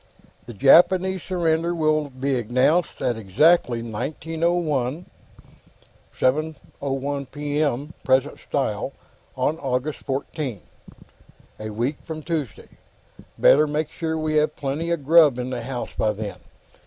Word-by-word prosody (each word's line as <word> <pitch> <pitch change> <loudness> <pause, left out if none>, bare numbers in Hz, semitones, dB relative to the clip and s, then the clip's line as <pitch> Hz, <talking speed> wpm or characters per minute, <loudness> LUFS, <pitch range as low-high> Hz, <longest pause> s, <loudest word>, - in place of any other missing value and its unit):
"The 120 - -8
Japanese 185 - +5
surrender 170 -1 0
will 155 -2 +1
be 135 +1 -2
announced 130 +9 +1
at 125 -3 0
exactly 120 - +3
1901 160 +4 -2 1.1
7:01 140 -1 -2
P. 145 0 -2
M. 145 +1 -1
present 130 +2 +1
style 130 -1 -2 0.4
on 145 +5 0
August 135 +2 -2
14. 135 - -4 1.0
A 110 0 -5
week 120 +7 -2
from 155 -1 -7
Tuesday. 155 -9 -4 0.7
Better 150 +2 +5
make 150 +1 -2
sure 160 -1 -3
we 155 -1 0
have 150 0 +2
plenty 145 +4 -3
of 170 -5 -2
grub 155 -4 +6
in 125 +1 -4
the 125 -2 -3
house 125 +1 -5
by 110 - +1
then. 105 -1 -6
145 Hz, 120 wpm, -23 LUFS, 130-160 Hz, 1.1 s, grub